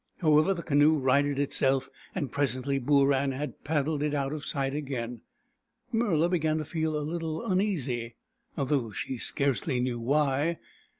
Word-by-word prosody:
How 155 -3 +4
ever, 190 +5 +2
the 170 - -6
canoe 150 +1 +4
righted 140 +1 +2
itself, 135 -1 +2 0.3
and 135 -5 -2
presently 135 0 0
Booran 140 0 +2
had 150 +2 -6
paddled 150 0 0
it 150 0 0
out 140 0 -1
of 155 -1 -5
sight 135 -2 -1
again. 125 -5 -4 0.7
Murla 190 -9 +2
began 160 -3 +1
to 155 - -3
feel 160 0 -1
a 150 - -2
little 165 +4 -3
uneasy, 150 - -1 0.4
though 135 -4 0
she 120 +4 -5
scarcely 140 -1 0
knew 125 -1 -1
why. 145 +5 +1
145 Hz, 155 wpm, -28 LUFS, 135-155 Hz, 0.7 s, How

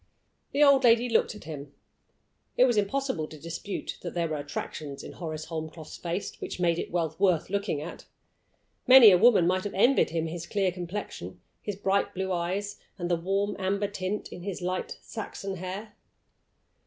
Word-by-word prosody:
The 290 - +4
old 280 -2 +6
lady 235 0 +5
looked 225 -1 +2
at 210 - -11
him. 145 -3 -8 0.8
It 255 - +7
was 245 -3 +2
impossible 210 - 0
to 155 - -11
dispute 170 +5 -5
that 175 - -6
there 170 -1 +1
were 155 -1 -2
attractions 145 0 -6
in - - -8
Horace 155 -3 -5
Holmcroft's 160 -1 -6
face 175 +3 -4
which - - -5
made 170 -1 +2
it - - -4
well 165 -3 -1
worth 185 -3 +2
looking 200 -7 -1
at. 170 - -9 0.8
Many 255 -5 +10
a 180 - +6
woman 215 -5 +6
might 185 +2 +1
have 205 - -5
envied 240 +7 +4
him 165 0 -1
his 170 +1 -5
clear 195 -1 +1
complexion, 175 - -6 0.2
his 205 - -4
bright 195 0 0
blue 190 0 -2
eyes, 185 +4 -2 0.2
and 175 -1 -3
the - - +4
warm 195 +4 -1
amber 200 +2 0
tint 200 +1 -4
in 175 - -9
his 195 0 -4
light 180 +1 -3
Saxon 200 -3 -6
hair. 190 +4 -6
185 Hz, 180 wpm, -28 LUFS, 170-205 Hz, 0.8 s, Many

